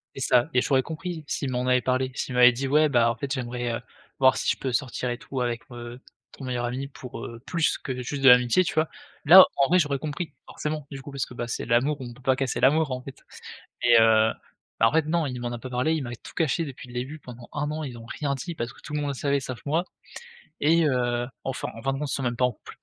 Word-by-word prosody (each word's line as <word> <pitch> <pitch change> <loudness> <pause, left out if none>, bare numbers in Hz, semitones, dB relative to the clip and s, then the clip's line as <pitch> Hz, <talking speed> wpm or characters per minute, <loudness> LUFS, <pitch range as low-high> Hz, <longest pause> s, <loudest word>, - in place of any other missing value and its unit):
C'est 135 - -6
ça, 125 -1 +3
et 125 - +4
j'aurais 135 0 +2
compris 165 +2 -6
s'il 135 -2 -2
m'en 125 0 -1
avait 125 0 +3
parlé, 130 +1 0
s'il 130 - -3
m'avait 125 0 +7
dit: 130 +3 -3
«Ouais, 150 +3 +4
bah, 120 -3 +3
en - - -5
fait, 135 +4 -5
j'aimerais, 120 -2 -2
heu, - - -5 0.4
voir 130 -1 +5
si - - -1
je - - +1
peux 130 - -3
sortir 125 0 -2
et 120 - -4
tout 135 - -6
avec, 120 -1 -1
heu, 120 0 -8 0.3
ton 135 - -10
meilleur 125 -1 -2
ami 130 +3 -3
pour, 125 -4 -9
heu, 115 0 -8
plus 170 -3 +1
que 130 -2 -5
juste 135 +3 -4
de 135 - +9
l'amitié», 125 +7 +6
tu - - -3
vois? 155 0 +1 0.4
Là 185 +6 +11
en 140 - +4
vrai 180 - +4
j'aurais 145 -5 +1
compris 155 +3 -5
forcément, 150 -1 -4
du 135 -1 -8
coup, 145 - -9
parce 140 -1 -2
que, 125 - -12
bah, 120 - -4
c'est 115 - -4
l'amour, 130 +5 +2
on 120 -2 -6
peut 130 - -17
pas 130 0 +3
casser 130 -1 -2
l'amour, 150 +3 +4
en 130 0 -3
fait, 135 0 -10 0.6
mais 120 -1 +7
heu, 110 0 +5 0.5
bah, 115 - +6
en - - +1
fait, 160 -1 +3
non, 165 +1 0
il 125 -2 -5
m'en 120 0 -3
a 120 - -5
pas 130 - -7
parlé, 125 +6 +1
il 160 - -1
m'a 120 - -5
tout - - -13
caché 165 0 +1
depuis 135 -3 -9
le 120 - -12
début 135 +6 -4
pendant 125 -3 -11
1 150 0 -2
an, 155 +1 -4
ils 125 -5 -6
ont 115 - -11
rien 140 +4 -3
dit 170 +6 -6
parce 120 -3 -4
que - - -18
tout 150 - -9
le 150 - 0
monde 145 - -2
le - - -4
savait 140 +1 0
sauf 130 -2 -6
moi 160 +5 0 0.7
et 165 +3 +4
heu, 120 -3 0 0.2
enfin 135 -1 -3
enfin 135 +4 -2
de 135 - -4
compte 150 -1 -3
ils - - -1
sont 135 - -2
même 120 -1 -1
pas 125 - -1
en 125 - +1
couple, 110 - -14
130 Hz, 275 wpm, -26 LUFS, 120-145 Hz, 0.7 s, Là